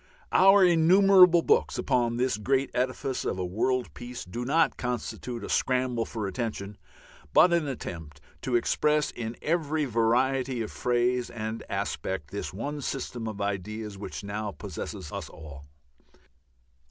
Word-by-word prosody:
Our 195 0 +7
innumerable 180 +1 +6
books - - +2
upon 120 -1 +1
this 125 -3 +1
great 135 +5 0
edifice 130 +1 -1
of - - -2
a 90 - -2
World 120 +7 -1
Peace 120 0 -8
do 105 +7 -5
not 160 +5 +2
constitute 125 0 -4
a - - -5
scramble 125 -3 +1
for 110 -3 -4
attention, 100 0 -4 0.5
but 175 - +6
an 170 -3 +1
attempt 80 - -7 0.2
to 125 - -1
express 150 +5 +2
in 115 0 -6
every 155 -2 0
variety 125 +2 +1
of 105 - -7
phrase 125 0 0
and 110 0 -5
aspect 90 -6 -3
this 100 - -4
one 145 +9 -5
system 125 -4 -4
of 105 -2 -5
ideas 100 +2 -3
which 100 +1 -7
now 105 +1 -3
possesses 100 -4 -7
us - - -6
all. 70 -3 -11
120 Hz, 140 wpm, -27 LUFS, 105-135 Hz, 0.5 s, Our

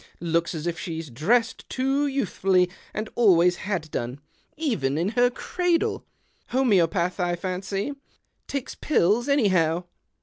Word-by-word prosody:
Looks 170 0 0
as 155 0 -5
if 170 -1 -2
she 165 -2 -4
dressed 175 - 0
too 270 +2 +1
youthfully, 190 -9 +1 0.2
and 215 +1 -4
always 180 -6 +4
had 175 -6 -3
done 125 +3 -3 0.2
— - - -41
even 185 - 0
in 170 +5 +1
her 245 +2 +3
cradle. 345 +6 -1 0.4
Homeopath, 185 -8 +2
I 175 -1 +1
fancy 190 +6 -3 0.3
— - - -49
talks 275 -2 -4
pills, 240 - +1
anyhow. 180 - +3
185 Hz, 135 wpm, -25 LUFS, 170-245 Hz, 0.4 s, always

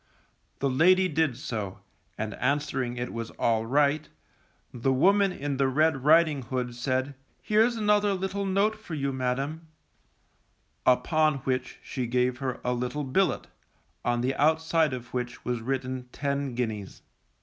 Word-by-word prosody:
The 140 - 0
lady 185 +7 +5
did 155 -6 0
so, 105 -7 -4 0.4
and 110 -1 -3
answering 130 -2 -1
it 120 0 -4
was 115 -1 -4
alright, 140 +7 +2 0.6
the 125 +2 0
woman 195 +9 +4
in 145 -5 -3
the 135 0 +3
red 145 0 +2
riding 155 -1 +5
hood 125 -1 -3
said, 130 +3 -1 0.3
Here's 220 +3 +2
another 210 -2 +2
little 190 +1 -2
note 200 +3 +2
for 215 -7 -7
you, 140 -2 -1
madam; 135 +5 -2 1.2
upon 155 +4 +3
which 130 -1 -2
she 125 -3 -3
gave 125 +1 +1
her 130 -2 -3
a 125 - 0
little 125 +4 -2
billet, 180 +9 +1 0.6
on 120 0 +1
the 130 +2 0
outside 160 -1 +3
of 125 -1 -7
which 125 -1 -4
was 120 -1 -1
written 130 0 -3
ten 140 -2 -2
guineas. 110 -5 -4
135 Hz, 140 wpm, -27 LUFS, 125-160 Hz, 1.2 s, lady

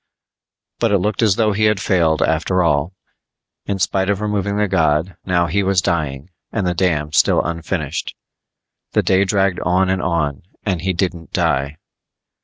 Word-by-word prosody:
But 115 -2 +1
it 100 - +4
looked 105 +4 -1
as 105 -4 +3
though 110 -1 +2
he 105 +2 +1
had 105 -2 +2
failed 85 -5 +2
after 85 +3 +1
all. 85 +3 0 0.7
In 100 - -1
spite 95 +1 0
of 100 -1 +1
removing 105 -1 -1
the 105 0 +1
god, 85 -1 +1
now 85 -2 +2
he 100 +4 0
was 95 -1 +2
dying 75 -2 -2 0.2
and 110 -4 -1
the 90 - +1
dam 80 -5 0
still - - +3
unfinished. 85 -2 -3 0.8
The - - +2
day 95 +1 +3
dragged 95 -1 +1
on 95 +2 +1
and 95 -1 0
on 75 -6 -1 0.2
and 95 -5 -1
he 95 0 0
didn't 85 -2 -3
die. 70 +3 0
90 Hz, 170 wpm, -19 LUFS, 80-100 Hz, 0.8 s, it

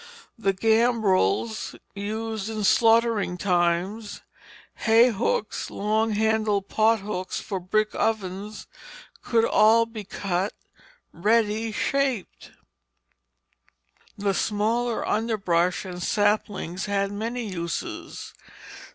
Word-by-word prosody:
The 200 -4 +1
gambrels 220 - +1 0.2
used 220 +1 -4
in 215 -1 -3
slaughtering 225 -3 +3
times, 180 +4 -1 0.5
hay 230 +2 +5
hooks, 220 0 -2
long 215 +2 0
handled 215 -2 +1
pothooks 210 -4 0
for 195 -3 -4
brick 215 +4 0
ovens, 210 -1 -2 0.6
could 230 -1 +2
all 225 +2 +5
be 225 -2 -8
cut 195 0 -2 0.6
ready 220 +4 +1
shaped. 265 -2 -2 1.7
The 200 -1 0
smaller 225 +4 0
underbrush 195 -6 0
and 180 -1 -7
saplings 205 -3 0
had 200 0 0
many 230 +4 -3
uses. 170 -5 -5
210 Hz, 90 wpm, -25 LUFS, 195-225 Hz, 1.7 s, hay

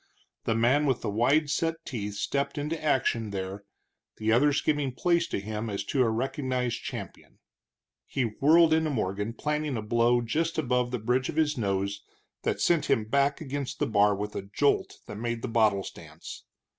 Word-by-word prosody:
The 115 - +1
man 130 +6 +3
with 130 -3 +1
the - - -2
wide 140 +8 +2
set 165 +1 0
teeth 105 -4 -4
stepped 140 +8 -2
into 155 +2 -3
action 120 -6 +1
there, 100 0 -5 0.5
the 110 0 0
others 145 +5 +4
giving 145 -4 0
place 170 +4 +1
to - - -2
him 110 +2 -4
as 100 -1 -3
to 130 +6 0
a 120 - +3
recognized 125 0 -2
champion. - - -8 0.7
He 135 - -1
whirled 155 +8 +4
into 160 0 +2
Morgan, 105 -3 -2
planting 150 0 -2
a - - -2
blow 120 +2 +3
just 160 +8 -1
above 125 -4 +1
the 125 - -2
bridge 125 +4 0
of - - -4
his 155 -2 +2
nose 100 -3 -1 0.4
that - - -1
sent 170 -3 +2
him 110 - +2
back 140 +6 +1
against 140 -2 -4
the - - +1
bar 105 -1 +3
with 105 +1 -5
a - - -2
jolt 105 +9 0
that 105 - -8
made 120 0 -3
the - - -1
bottles 110 -4 +2
dance. - - -11
125 Hz, 180 wpm, -28 LUFS, 110-145 Hz, 0.7 s, others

